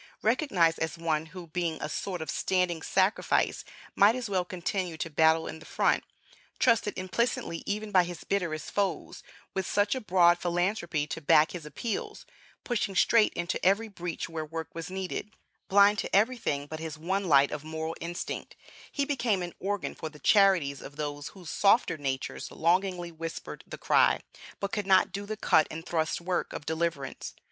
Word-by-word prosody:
Recognized 200 - +2
as 160 +1 -2
one, 160 -1 -1
who, 180 +1 -9
being 165 0 -2
a - - -3
sort 175 +2 -3
of 155 - -4
standing 180 -3 0
sacrifice, 190 +4 +1 0.3
might 205 +4 +6
as 245 -5 -4
well 185 -2 +2
continue 180 -1 -3
to 165 +1 -4
battle 160 +1 +4
in 160 - -6
the - - -13
front; - - +2 0.5
trusted 230 -4 +2
implicitly 185 -2 -1
even 210 +1 -2
by 185 -2 +5
his 175 0 -7
bitterest 170 -6 -2
foes; 200 -1 -2 0.3
with 190 -1 -2
such 205 0 +2
a 260 - -3
broad 175 -3 +4
philanthropy 175 -3 0
to 155 +2 -6
back 150 +2 +5
his 165 -4 -7
appeals; 205 - -4 0.4
pushing 210 -5 -1
straight 225 +2 +4
into 175 +1 -3
every 200 +5 +3
breach 175 -5 -5
where 165 -1 -4
work 160 +1 -6
was 165 0 -6
needed; 190 +3 -5 0.3
blind 200 +1 +5
to - - -1
everything 205 - +1
but 155 +2 -7
his 160 -1 -6
one 190 +5 -1
light 140 -4 +5
of 150 -1 -5
moral 160 +1 -4
instinct; 170 +1 -5 0.4
he 280 - 0
became 240 -10 0
an 175 - -6
organ 200 -1 -2
for 160 - -6
the 150 - -14
charities 170 -5 +4
of 145 - -10
those 145 -1 -4
whose 180 -5 -9
softer 205 -1 +3
natures 135 -2 -3
longingly 175 +1 0
whispered 165 0 -7
the - - -7
cry, - - +4 0.4
but 200 0 -3
could 210 -3 -2
not 190 -1 +5
do 200 +1 -5
the 215 0 -4
cut 160 -6 +4
and 165 +2 -7
thrust 160 -2 -1
work, 175 +1 -2
of 145 - -6
deliverance. 160 -4 -3
175 Hz, 175 wpm, -29 LUFS, 160-200 Hz, 0.5 s, might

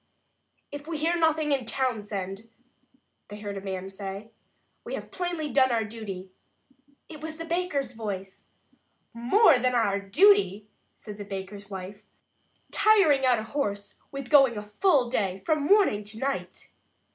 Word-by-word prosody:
"If 290 +1 -8
we 325 -2 -3
hear 325 +3 +1
nothing 315 -2 +2
in 270 -3 +1
Townsend," 215 -4 -3 0.8
they 205 - -9
heard 205 -1 -5
a 195 - -5
man 190 -1 -5
say, 195 +2 -7 0.5
"we - - -4
have - - -8
plainly 345 -5 -3
done 260 -2 +4
our 230 -2 +1
duty." 205 -4 -7 0.8
It 310 -3 -11
was 315 0 -6
the 330 - -6
baker's 330 -7 -1
voice! 200 -5 -6 0.7
"More 260 - +5
than 250 0 +1
our 205 -4 +2
duty," 245 - +4 0.3
said 210 -2 -10
the - - -4
baker's 195 +1 -7
wife, 190 +1 -7 0.7
"tiring 320 -12 +4
out 250 -2 +4
a 215 - -3
horse 205 -5 -4
with 275 -2 -7
going 270 -6 +6
a 210 - -5
full 260 - +2
day, 195 -6 -2
from 305 -2 +1
morning 395 - +4
until 210 +2 -10
night!" 275 +1 -4
235 Hz, 150 wpm, -27 LUFS, 200-300 Hz, 0.8 s, going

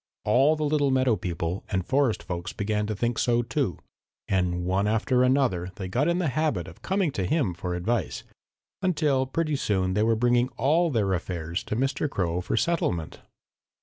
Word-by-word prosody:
All 135 +8 +4
the 155 - -3
little 145 -1 +2
meadow 130 -3 +3
people 85 -1 -3
and 95 -3 -1
forest 130 -5 +1
folks 85 0 -5
began 105 +1 -1
to 110 - -2
think 120 +3 -1
so, 120 0 +2
too, 120 - -1 0.5
and 90 -2 0
one 95 +3 +1
after 115 +4 +2
another 125 -9 +2
they 95 - -5
got 125 - +1
in 170 0 +2
the 175 -5 0
habit 135 - -1
of 85 - -13
coming 190 -4 0
to 100 - -2
him 135 - +1
for 90 +1 -4
advice, 110 +7 -2 0.6
until 150 -8 +1
pretty 155 +2 -1
soon 95 -8 0
they 105 - +1
were 115 +1 +3
bringing 120 +2 +2
all 165 +6 +3
their 105 -8 +1
affairs 85 -1 -3
to - - -3
Mr. 135 +4 0
Crow 90 -7 -1
for 90 +5 -2
settlement. 105 - -1
115 Hz, 180 wpm, -26 LUFS, 95-140 Hz, 0.6 s, All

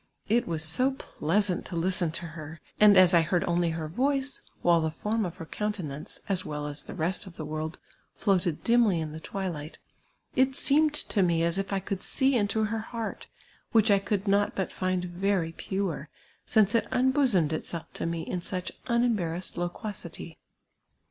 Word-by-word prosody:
It 230 +3 +2
was 160 -2 -1
so 250 - +4
pleasant 200 - 0
to 175 - -6
listen 175 0 +1
to 170 - -3
her, 160 -1 -8 0.2
and 210 -2 +8
as 185 -1 +7
I 170 - +7
heard 170 +2 +1
only 175 0 +1
her 160 -1 -3
voice, 270 - 0 0.2
while 170 -1 +5
the 160 - 0
form 210 +7 -1
of 175 - -8
her 175 -3 -8
coun 210 +5 -2
tenance, 150 -7 -7
as 190 -2 +1
well 150 -1 -4
as 145 0 -2
the - - -9
rest 185 +4 0
of 175 - -11
the 155 - -6
world, 155 +1 -4 0.4
floated 185 -6 +1
dimly 230 -7 +4
in 155 -1 -3
the 155 - -7
twilight, 170 -4 -5 0.6
it 260 +1 +3
seemed 300 +2 +4
to 210 - +1
me 170 -2 +2
as 170 +3 +1
if 195 0 -3
I 195 - +1
could 190 0 -4
see 270 -1 +2
into 215 -1 +1
her 220 +1 -1
heart, 225 0 -5 0.5
which 220 -1 +5
I 200 - +5
could 200 +1 -2
not 200 +1 +2
but 190 - -2
find 185 -1 -1
xcry 180 -2 -1
pure, 190 -6 -3 0.4
since 215 -2 +4
it 230 - +2
unbosomed 250 - +2
itself 165 +1 -4
to - - -3
me 165 -1 -2
in 180 +2 -3
such 180 +1 -4 0.2
unembarrassed 215 -8 0
loquacity. 175 -2 -5
185 Hz, 185 wpm, -28 LUFS, 165-210 Hz, 0.6 s, and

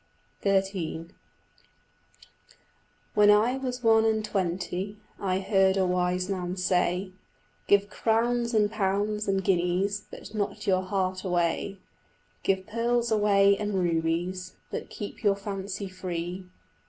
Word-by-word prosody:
XIII 190 -4 0 2.0
When 205 0 +5
I 220 +5 +4
was 255 -2 -4
one 225 -1 +5
and 220 -1 +1
twenty 185 +1 -2 0.2
I 185 -2 0
heard 195 0 +3
a 190 - +3
wise 180 0 0
man 185 -2 -3
say, 180 0 +1 0.6
"Give 200 0 +4
crowns 235 +2 +1
and 210 -1 +3
pounds 210 0 0
and 195 -1 +1
guineas 190 +3 +1
But - - -10
not 210 0 -3
your 185 -1 +3
heart 185 -1 -2
away; 180 +2 0 0.6
Give 190 -1 0
pearls 235 +1 0
away 200 -2 +4
and 210 -1 -2
rubies 175 +1 -1 0.2
But - - -5
keep 205 - -7
your 205 -3 +3
fancy 200 0 -5
free." 185 0 -5
195 Hz, 120 wpm, -27 LUFS, 185-210 Hz, 2.0 s, When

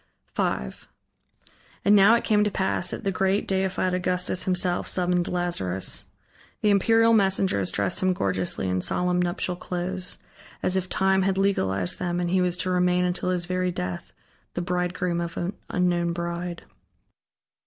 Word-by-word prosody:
V - - -1 1.4
And 205 - +6
now 205 +3 +7
it 235 - 0
came 210 -1 +3
to 210 - +1
pass 190 -2 -1
that - - -6
the 195 - 0
great, 190 +2 0
deified 190 -1 0
Augustus 180 0 +1
himself 180 -1 +1
summoned 180 -1 +2
Lazarus. 100 - -2 0.6
The 210 - +3
imperial 225 +3 +4
messengers 190 - +2
dressed 100 -2 -1
him 185 0 +3
gorgeously, 95 - -1
in 90 0 0
solemn 180 - 0
nuptial 180 +1 -1
clothes, 180 +1 -3 0.5
as 185 - +2
if 185 -1 -1
Time 190 0 +2
had 190 0 +1
legalized 95 - 0
them, 175 -1 -1
and 175 -1 -1
he 185 0 +3
was 180 -1 0
to 185 - -1
remain 180 0 +2
until 180 0 -1
his 180 -1 -1
very 185 0 -1
death 90 - -5 0.4
the 175 - -1
bridegroom 180 -1 -1
of 170 -1 -5
an 175 +3 -2 0.2
unknown 175 -1 +1
bride. 170 0 -4
180 Hz, 155 wpm, -25 LUFS, 175-190 Hz, 1.4 s, now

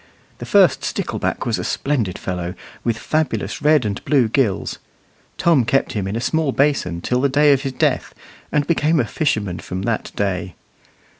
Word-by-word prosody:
The - - -7
first 175 -10 +4
stickleback - - -2
was - - 0
a - - -3
splendid 120 -11 -1
fellow, 90 0 -4 0.3
with 115 -2 0
fabulous 145 -5 -2
red 150 -4 +4
and 100 -1 -3
blue 135 -5 +3
gills. 115 -6 0 0.6
Tom 165 -7 +4
kept 135 +4 +1
him 100 -3 -2
in 100 - -3
a - - -1
small 155 +3 0
basin 135 -13 +1
till 125 +6 0
the 140 - +2
day 145 +2 +5
of 135 - +1
his 135 -1 -3
death, - - 0 0.4
and 145 -1 +1
became 160 -1 +2
a 120 - +2
fisherman 105 - -1
from 95 +1 -5
that 115 +1 -2
day. 95 -2 -2
130 Hz, 175 wpm, -20 LUFS, 100-150 Hz, 0.6 s, day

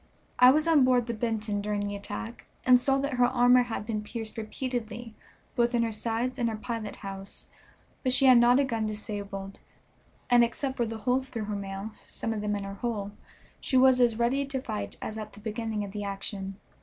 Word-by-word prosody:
I 250 - +9
was 305 +4 +3
on 315 -5 +6
board 250 -2 +3
the 235 - -3
Benton 215 -2 -2
during 205 0 -1
the 205 - -4
attack, 205 +3 -7 0.2
and 250 -1 +7
saw 270 +2 +2
that 280 +1 -1
her - - +7
armor 245 0 +5
had 235 -3 -3
been 215 -1 -2
pierced 220 +1 -6
repeatedly 230 0 -4 0.4
both 240 0 +2
in 235 - +3
her 230 - -1
sides 230 +4 -2
and 235 -1 +2
her 220 - -3
pilot 215 -1 -4
house, 195 0 -8 0.6
but 255 - +1
she 270 +1 +4
had 255 -2 +8
not 245 +2 +5
a - - +4
gun 225 -5 -1
disabled; 200 -2 -6 0.7
and 240 -1 +6
except 260 +3 -2
for 235 -3 0
the 225 0 -5
holes 255 +4 0
through 225 -3 -4
her 210 0 -3
mail, 195 +1 -5 0.2
some 225 - -3
of 215 - -3
them 210 0 -1
in 200 - -3
her 195 0 -5
hull, 210 -4 -2 0.5
she 260 - +1
was 255 -1 +6
as 235 -2 +3
ready 245 +4 +2
to 275 -1 -3
fight 220 -5 -5
as 220 0 -4
at 215 -1 -7
the 205 - -12
beginning 220 0 -3
of 200 - -6
the 205 0 -4
action. 195 -1 -5
225 Hz, 215 wpm, -28 LUFS, 210-250 Hz, 0.7 s, I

